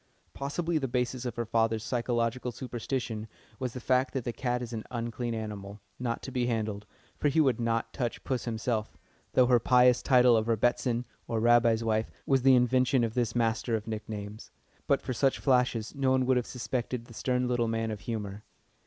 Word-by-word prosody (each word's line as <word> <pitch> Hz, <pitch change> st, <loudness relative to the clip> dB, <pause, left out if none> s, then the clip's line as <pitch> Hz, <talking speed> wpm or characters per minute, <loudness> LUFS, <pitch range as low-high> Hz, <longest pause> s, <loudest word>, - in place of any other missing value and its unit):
Possibly 160 Hz, +4 st, -1 dB
the 135 Hz, -, -2 dB
basis 125 Hz, 0 st, -2 dB
of 120 Hz, -, -3 dB
her 120 Hz, -1 st, -2 dB
father's 115 Hz, -1 st, +1 dB
psychological 120 Hz, 0 st, -1 dB
superstition 120 Hz, -2 st, -4 dB, 0.3 s
was 125 Hz, -3 st, -3 dB
the 125 Hz, -, -5 dB
fact 130 Hz, +2 st, +1 dB
that 130 Hz, -, -1 dB
the 120 Hz, -, -3 dB
cat 125 Hz, -1 st, -1 dB
is 120 Hz, 0 st, -7 dB
an 110 Hz, -1 st, -4 dB
unclean 120 Hz, 0 st, -3 dB
animal, 105 Hz, -2 st, -6 dB, 0.2 s
not 120 Hz, -2 st, -2 dB
to 135 Hz, -, -6 dB
be 125 Hz, -1 st, 0 dB
handled, 110 Hz, -3 st, -2 dB, 0.3 s
for 145 Hz, -, +2 dB
he 145 Hz, -, +1 dB
would 130 Hz, -7 st, +3 dB
not 115 Hz, -1 st, -1 dB
touch 120 Hz, -4 st, -3 dB
puss 130 Hz, -2 st, -2 dB
himself, 110 Hz, -1 st, -2 dB, 0.4 s
though 130 Hz, -, +5 dB
her 125 Hz, -1 st, +4 dB
pious 125 Hz, +1 st, +5 dB
title 125 Hz, -3 st, +5 dB
of 110 Hz, 0 st, +1 dB
"Rebbitzin," 120 Hz, +2 st, +1 dB, 0.2 s
or 115 Hz, -, -1 dB
Rabbi's 115 Hz, 0 st, +4 dB
wife, 110 Hz, -1 st, 0 dB, 0.2 s
was 135 Hz, -1 st, +3 dB
the 130 Hz, 0 st, +6 dB
invention 125 Hz, +1 st, +3 dB
of 115 Hz, -1 st, -1 dB
this 120 Hz, -2 st, 0 dB
master 115 Hz, 0 st, +1 dB
of 110 Hz, -1 st, -3 dB
nicknames. 105 Hz, -1 st, -6 dB, 0.4 s
But -, -, +2 dB
for 130 Hz, -, -2 dB
such 135 Hz, +2 st, +2 dB
flashes 125 Hz, -4 st, +1 dB
no 135 Hz, -2 st, 0 dB
one 130 Hz, 0 st, +3 dB
would 130 Hz, 0 st, +3 dB
have 125 Hz, -, -1 dB
suspected 125 Hz, -1 st, -3 dB
the 120 Hz, -, -14 dB
stern 125 Hz, +2 st, 0 dB
little 120 Hz, -1 st, +1 dB
man 115 Hz, 0 st, -1 dB
of 105 Hz, -, -5 dB
humour. 105 Hz, -1 st, -5 dB
120 Hz, 195 wpm, -29 LUFS, 115-125 Hz, 0.4 s, the